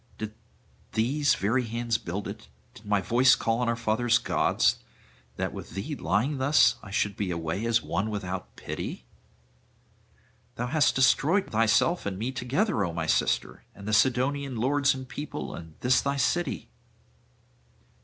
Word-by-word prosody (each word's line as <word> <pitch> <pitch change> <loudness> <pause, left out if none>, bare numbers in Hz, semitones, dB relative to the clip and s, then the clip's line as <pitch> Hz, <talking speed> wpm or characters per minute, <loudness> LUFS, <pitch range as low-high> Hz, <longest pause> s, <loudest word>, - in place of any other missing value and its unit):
Did 110 0 -5 0.6
these 140 +7 +2
very 115 +6 +1
hands 115 0 -1
build 95 +4 -5
it, - - -8 0.3
did 105 - -15
my 105 -1 +2
voice 125 +8 +5
call 115 -2 0
on 125 -1 +1
our 115 - +1
father's 115 +1 +2
gods, - - +1 0.6
that - - -3
with - - -9
thee - - -4
lying 115 - 0
thus 140 +3 +4
I 105 - -11
should 100 0 0
be 100 -3 -2
away 85 +3 -3
as 115 0 +2
one 105 +3 -1
without 95 -3 -5
pity? - - -6 1.5
Thou 120 - -2
hast 145 +4 +2
destroyed 155 +8 +3
thyself 115 - +2
and 95 -2 -3
me 115 +6 -2
together, 130 - 0
O 90 - -1
my 85 - -2
sister, - - 0
and 100 +1 -10
the 110 - -1
Sidonian 130 +4 +2
lords 140 +4 +2
and 130 -1 -7
people, 145 +3 -6
and 80 -2 -10
this 125 +1 +3
thy 140 0 -1
city. 175 +6 -1
115 Hz, 155 wpm, -27 LUFS, 105-135 Hz, 1.5 s, voice